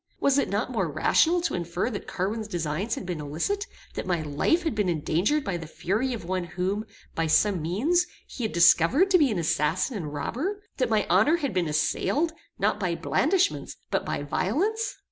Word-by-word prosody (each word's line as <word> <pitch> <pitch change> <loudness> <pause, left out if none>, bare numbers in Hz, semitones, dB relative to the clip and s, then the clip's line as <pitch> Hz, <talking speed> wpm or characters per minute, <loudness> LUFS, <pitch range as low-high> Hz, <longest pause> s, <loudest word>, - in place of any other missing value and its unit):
Was 280 0 +3
it - - 0
not 210 +5 -1
more 190 -10 -1
rational 325 - +3
to 345 - -1
infer 175 +6 -2
that 205 - -6
Carwin's 210 +4 -2
designs 175 +3 -2
had - - -6
been 175 -4 -4
illicit; 170 - -2 0.3
that - - -5
my 175 -3 0
life 155 - +1
had 320 - 0
been 210 -4 0
endangered 175 - +1
by 195 -7 -2
the 165 -2 -8
fury 215 +11 -1
of 230 -8 -5
one 185 0 -2
whom, 190 +5 -2 0.3
by 165 0 0
some 190 +2 +3
means, 285 - +1 0.2
he 250 - -7
had 220 - -1
discovered 175 - +5
to 365 - +6
be 290 -4 +4
an 210 - -1
assassin 165 - 0
and 160 -7 -4
robber; 300 - -3
that 255 -3 +1
my 215 -2 +2
honor 215 - +4
had 280 - -2
been 180 -3 +1
assailed, 155 - 0 0.2
not - - +1
by - - 0
blandishments, 385 0 +1 0.2
but - - +1
by - - -3
violence? 400 - -1
205 Hz, 195 wpm, -26 LUFS, 170-280 Hz, 0.3 s, to